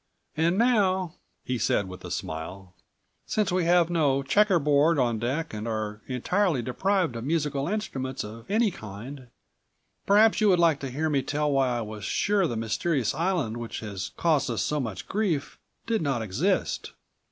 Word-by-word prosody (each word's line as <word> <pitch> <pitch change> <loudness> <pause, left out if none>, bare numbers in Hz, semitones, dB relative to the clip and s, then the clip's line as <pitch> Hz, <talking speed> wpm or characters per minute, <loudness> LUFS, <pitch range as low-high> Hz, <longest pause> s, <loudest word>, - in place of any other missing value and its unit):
"And 170 +4 +2
now," 190 -7 +2 0.3
he 125 -1 -2
said 100 -2 +1
with 95 0 -10
a - - -7
smile, 90 +4 -6 0.5
"since 210 -4 0
we 180 -1 +1
have 175 0 +4
no 140 -5 +2
checker 205 +6 +4
board 150 +1 +3
on 120 -4 +1
deck 145 +8 -2
and 105 +2 -4
are 110 -1 -3
entirely 150 - 0
deprived 175 - 0
of 115 - -5
musical 145 -2 -1
instruments 135 -11 -3
of 115 +2 -10
any 220 0 +2
kind, 120 - -9 0.8
perhaps 215 +2 +5
you 215 - +5
would 185 - +5
like 165 -4 +3
to 135 - -4
hear 150 +5 -1
me 145 -3 +1
tell 150 +2 -1
why 135 -2 +2
I - - -2
was 105 -2 -7
sure 200 - +1
the 120 - -3
mysterious 115 - 0
island 165 - -1
which 120 -1 -5
has 100 -4 -5
caused 155 -5 +2
us - - -1
so 150 - -1
much 110 -8 -5
grief, 190 -9 -1 0.3
did 230 -1 0
not 135 -7 0
exist." 95 -4 -1
145 Hz, 175 wpm, -27 LUFS, 115-175 Hz, 0.8 s, perhaps